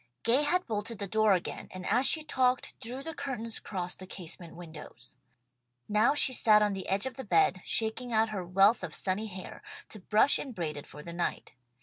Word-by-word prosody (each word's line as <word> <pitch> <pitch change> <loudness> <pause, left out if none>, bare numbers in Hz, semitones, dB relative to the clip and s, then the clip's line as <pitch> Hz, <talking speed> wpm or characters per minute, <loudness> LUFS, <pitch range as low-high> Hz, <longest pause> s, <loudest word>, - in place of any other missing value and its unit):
Gay 240 +5 +3
had 355 +5 +1
bolted 220 0 -4
the 200 - -4
door 215 +1 +3
again, 180 - -3
and 185 0 -9
as 250 +4 +6
she 315 - +7
talked, 255 -4 0
drew 250 +4 -4
the 325 - -5
curtains 245 -6 -4
across 180 -3 -5
the 185 - -11
casement 170 -2 -5
windows. 155 -7 -12 0.7
Now 215 +7 +3
she 265 -3 +4
sat 215 -3 +5
on 205 -1 0
the 190 -1 -6
edge 195 +4 +1
of 260 - -6
the 265 - -5
bed, 390 - +2
shaking 230 +2 -1
out 220 0 +2
her 200 -4 -4
wealth 195 +5 +3
of 165 -4 -6
sunny 200 +3 -2
hair, 190 -2 -9 0.3
to 215 - -11
brush 215 +8 +2
and 260 -5 -7
braid 160 -4 -3
it 145 - -9
for 150 - -11
the 170 - -8
night. 170 0 -3
210 Hz, 210 wpm, -29 LUFS, 185-250 Hz, 0.7 s, she